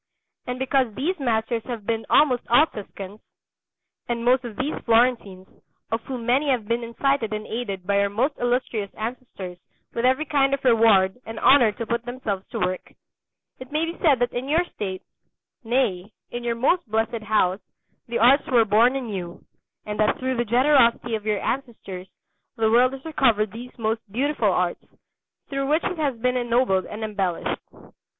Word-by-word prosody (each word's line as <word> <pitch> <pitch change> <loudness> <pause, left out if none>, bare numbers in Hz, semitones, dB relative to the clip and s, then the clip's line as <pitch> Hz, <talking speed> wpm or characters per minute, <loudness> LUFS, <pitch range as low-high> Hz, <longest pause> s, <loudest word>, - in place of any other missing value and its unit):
And 250 0 -3
because 260 -4 0
these 330 - -1
masters 230 -2 0
have 235 -5 -6
been 225 0 -2
almost 260 -5 +4
all 245 +6 +6
Tuscans, 205 -5 -9 0.9
and 235 0 -2
most 255 +1 +4
of 235 -3 -7
these 275 +7 -2
Florentines, 225 -5 +1 0.4
of 225 0 -1
whom 250 -3 -5
many 265 +5 +2
have 240 -6 0
been 235 +1 0
incited 235 0 0
and 215 0 -4
aided 200 -5 -4
by 200 +1 +2
your 200 0 +2
most 245 +9 0
Illustrious 240 -4 -1
ancestors 215 -6 -6 0.3
with 235 - -2
every 260 +5 +2
kind 275 -2 +2
of 275 - -13
reward 225 -5 +4
and 225 0 -7
honour 250 -5 +6
to 230 - -5
put 235 +1 -2
themselves 240 -6 -4
to - - -4
work, 185 0 -3 0.7
it 255 +1 -10
may 310 +2 +1
be 335 +1 -5
said 295 -6 +5
that 245 0 -1
in 255 +3 -4
your 335 +4 +2
state, 190 -2 -5 0.6
nay, 225 -5 0 0.2
in 240 0 -5
your 235 -1 -1
most 265 +4 +1
blessed 225 +1 -1
house 205 -3 +1 0.5
the 235 0 -2
arts 270 +6 +5
were 240 -5 +4
born 225 +5 +4
anew, 195 -9 -5 0.4
and 210 0 -5
that 215 - +2
through 260 0 -2
the 240 0 0
generosity 240 -1 +3
of 215 -1 -3
your 210 -1 +1
ancestors 220 -8 -4 0.5
the 220 -2 +1
world 250 +3 +4
has 270 +2 -9
recovered 235 -10 +2
these 240 +3 -10
most 225 0 -1
beautiful 255 -1 +1
arts, 180 -1 -1 0.7
through 275 -1 -2
which 310 +3 +2
it 365 -3 -3
has 280 -6 0
been 250 +2 +1
ennobled 240 -6 +1
and 215 +1 -6
embellished. 195 -5 -2
235 Hz, 175 wpm, -24 LUFS, 215-260 Hz, 0.9 s, all